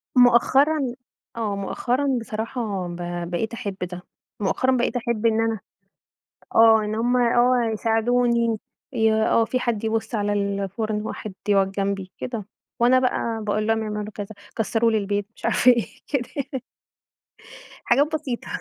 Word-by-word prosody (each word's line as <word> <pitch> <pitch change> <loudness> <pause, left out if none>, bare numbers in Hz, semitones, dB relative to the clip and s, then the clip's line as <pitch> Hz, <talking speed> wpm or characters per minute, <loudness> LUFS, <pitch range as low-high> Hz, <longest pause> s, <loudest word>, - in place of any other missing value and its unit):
مؤخرًا 255 +2 +4 0.4
آه، 215 -3 -2
مؤخرًا 250 +7 0
بصراحة 220 -4 -3
ب 175 - -6 0.3
بقيت 220 +6 -2
أحب 210 -5 -4
ده، 180 0 -4 0.4
مؤخرًا 255 +6 +1
بقيت 240 - 0
أحب 235 -2 -1
إن 225 0 +3
أنا 225 -2 0 1.0
آه 225 -1 +6
إن 210 +1 -2
هُم 240 +3 +1
آه 240 -1 +3
يساعدوني 235 +1 +1 0.4
ي 220 -1 +3
آه، 220 +1 +3
في 255 +2 -1
حد 225 -3 -1
يبُص 225 +1 -1
على 205 -1 0
الفرن، 200 +2 -2
واحد 215 -2 -6 0.2
يقعد 195 -1 +3
جنبي 195 -1 -2
كده، 225 -5 -5 0.3
وأنا 250 +2 +5
بقى 230 -3 -1
باقول 215 +1 0
لهم 225 0 +1
يعملوا 210 0 -4
كذا، 205 -1 -5 0.3
كسروا 225 +1 +2
لي 220 - +2
البيت 205 0 -1
مش - - -17
عارفة 250 - +5
إيه 235 -2 +1 0.2
كده 255 -5 -1
يعني. 270 -2 -4 1.2
حاجات 285 +6 +3
بسيطة. 255 -6 -4
225 Hz, 145 wpm, -23 LUFS, 210-245 Hz, 1.2 s, آه